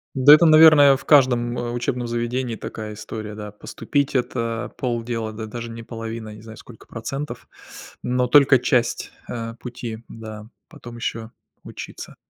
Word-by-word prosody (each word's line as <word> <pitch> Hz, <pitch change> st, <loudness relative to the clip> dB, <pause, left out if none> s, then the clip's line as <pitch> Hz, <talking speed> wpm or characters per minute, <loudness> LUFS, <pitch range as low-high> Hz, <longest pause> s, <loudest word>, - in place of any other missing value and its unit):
Да, 135 Hz, +3 st, +8 dB
это, 170 Hz, +2 st, +7 dB
наверное, 155 Hz, -3 st, +8 dB
в -, -, -15 dB
каждом, 125 Hz, -4 st, +4 dB
э, 120 Hz, 0 st, -3 dB
учебном 120 Hz, 0 st, -2 dB
заведении 120 Hz, +1 st, -2 dB
такая 110 Hz, -1 st, -7 dB
история, 105 Hz, 0 st, -7 dB
да. 105 Hz, -1 st, -7 dB
Поступить- 140 Hz, +7 st, -3 dB
это 115 Hz, -2 st, -2 dB
полдела, 115 Hz, -2 st, -3 dB
да 110 Hz, 0 st, -6 dB
даже 120 Hz, +2 st, -7 dB
не 115 Hz, 0 st, -8 dB
половина, 115 Hz, -1 st, -7 dB
я 105 Hz, -, -10 dB
не 105 Hz, -, -13 dB
знаю, 110 Hz, 0 st, -12 dB
сколько 115 Hz, -3 st, -15 dB
процентов, 125 Hz, +2 st, -6 dB, 0.5 s
но 125 Hz, 0 st, 0 dB
только 140 Hz, +1 st, +6 dB
часть, 120 Hz, -1 st, 0 dB, 0.2 s
а, 115 Hz, -1 st, -5 dB
пути, 120 Hz, -2 st, -7 dB
да. 110 Hz, -1 st, -9 dB, 0.2 s
Потом 120 Hz, -7 st, -12 dB
еще 115 Hz, -1 st, -4 dB, 0.3 s
учиться. -, -, -9 dB
120 Hz, 155 wpm, -22 LUFS, 115-125 Hz, 0.5 s, Да